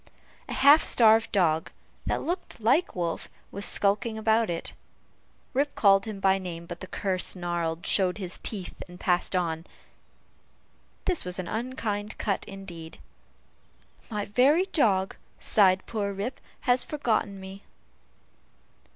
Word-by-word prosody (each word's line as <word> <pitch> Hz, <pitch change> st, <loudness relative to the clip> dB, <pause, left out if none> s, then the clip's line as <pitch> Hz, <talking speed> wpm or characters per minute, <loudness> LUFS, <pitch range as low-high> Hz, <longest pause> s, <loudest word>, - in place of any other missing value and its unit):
A -, -, -3 dB
half 285 Hz, +3 st, +7 dB
starved 225 Hz, -1 st, +5 dB
dog, 165 Hz, -6 st, +2 dB, 0.4 s
that -, -, 0 dB
looked 355 Hz, -4 st, -4 dB
like 260 Hz, +11 st, +2 dB
Wolf, 170 Hz, -2 st, -3 dB, 0.2 s
was 200 Hz, +1 st, -3 dB
skulking 205 Hz, +3 st, +1 dB
about 220 Hz, 0 st, +2 dB
it. 170 Hz, -1 st, -3 dB, 0.8 s
Rip 280 Hz, +2 st, 0 dB
called 195 Hz, -2 st, +5 dB
him 215 Hz, -3 st, -6 dB
by 195 Hz, 0 st, +3 dB
name, 170 Hz, -2 st, -6 dB
but 175 Hz, 0 st, -8 dB
the 185 Hz, -, -8 dB
cur 190 Hz, -1 st, -2 dB
snarled, 175 Hz, -2 st, -1 dB
showed 185 Hz, -1 st, +2 dB
his 185 Hz, -3 st, -5 dB
teeth, 195 Hz, -5 st, -6 dB
and 180 Hz, 0 st, -13 dB
passed 180 Hz, +1 st, +1 dB
on. 165 Hz, -3 st, -1 dB, 1.4 s
This 365 Hz, -3 st, 0 dB
was 180 Hz, 0 st, -3 dB
an 185 Hz, -2 st, -4 dB
unkind 215 Hz, -3 st, -3 dB
cut 200 Hz, -3 st, -1 dB
indeed. 180 Hz, -5 st, -9 dB, 1.1 s
"My 210 Hz, -3 st, -2 dB
very 280 Hz, -, +4 dB
dog," 195 Hz, -, +2 dB, 0.2 s
sighed 190 Hz, -3 st, +4 dB
poor 205 Hz, -3 st, -2 dB
Rip, 205 Hz, +7 st, -4 dB, 0.2 s
"has 245 Hz, -1 st, +3 dB
forgotten 220 Hz, -9 st, -1 dB
me!" 190 Hz, +1 st, -9 dB
200 Hz, 135 wpm, -27 LUFS, 180-225 Hz, 1.4 s, half